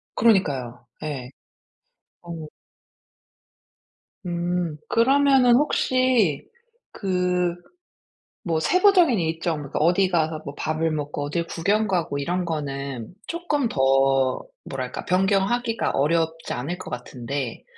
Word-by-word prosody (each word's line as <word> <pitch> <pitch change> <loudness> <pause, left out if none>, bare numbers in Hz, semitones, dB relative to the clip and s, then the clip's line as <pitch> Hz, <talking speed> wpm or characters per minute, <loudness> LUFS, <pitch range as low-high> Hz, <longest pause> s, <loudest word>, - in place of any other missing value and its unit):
그러니까요 135 - +1 0.2
예. 135 -5 -5 0.9
어. 165 -2 -7 1.8
음. 175 -2 -2
그러면은 265 0 +4
혹시 255 - +2 0.4
그 180 -2 0 0.9
뭐 160 -1 +1
세부적인 360 - +4
일정 165 0 -1
그러니까 145 0 -4
어디 180 +4 +3
가서 160 -3 0
뭐 140 - -6
밥을 155 +2 -1
먹고 145 -1 -3
어딜 170 +3 -2
구경 205 +5 0
가고 165 -6 -1
이런 175 +4 -1
거는 140 -6 -4
쪼끔 315 -7 -1
더 135 -1 +2 0.2
뭐랄까 130 -2 -5
변경하기가 200 +5 +1
어렵지 160 +3 0
않을 145 +9 -4
것 - - -9
같은데 125 +1 -5
165 Hz, 220 characters per minute, -24 LUFS, 145-195 Hz, 1.8 s, 그러면은